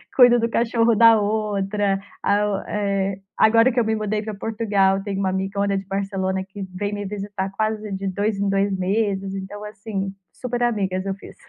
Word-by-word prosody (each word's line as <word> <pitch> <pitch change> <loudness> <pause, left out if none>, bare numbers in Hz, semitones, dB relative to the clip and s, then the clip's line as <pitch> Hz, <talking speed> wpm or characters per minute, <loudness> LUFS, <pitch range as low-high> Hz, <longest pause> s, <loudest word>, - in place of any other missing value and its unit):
cuido 245 -2 +7
do 230 0 0
cachorro 230 0 +2
da 230 0 +7
outra. 205 -1 0 0.2
A 205 +1 +2
o 200 - 0
eh, 195 -1 -1 0.2
agora 230 +3 +5
que 250 - +1
eu 230 - +2
me 220 - +1
mudei 215 0 -1
pra 215 - -5
Portugal, 200 -2 +1
tem 200 -2 -3
uma 195 -1 0
amigona 195 +1 -1
de 195 - -5
Barcelona 195 -1 -2
que 195 +1 -7
vem 205 +2 -3
me 205 0 -4
visitar 200 -1 -4
quase 215 +1 -2
de 195 0 -3
2 200 +2 -1
em 200 0 +1
2 195 0 +1
meses. 195 0 -1
Então 195 +2 -7
assim, 200 -2 -5 0.2
super 245 +3 -4
amigas 195 -5 0
eu 195 - -1
fiz. 200 - -13
200 Hz, 190 wpm, -22 LUFS, 195-215 Hz, 0.2 s, cuido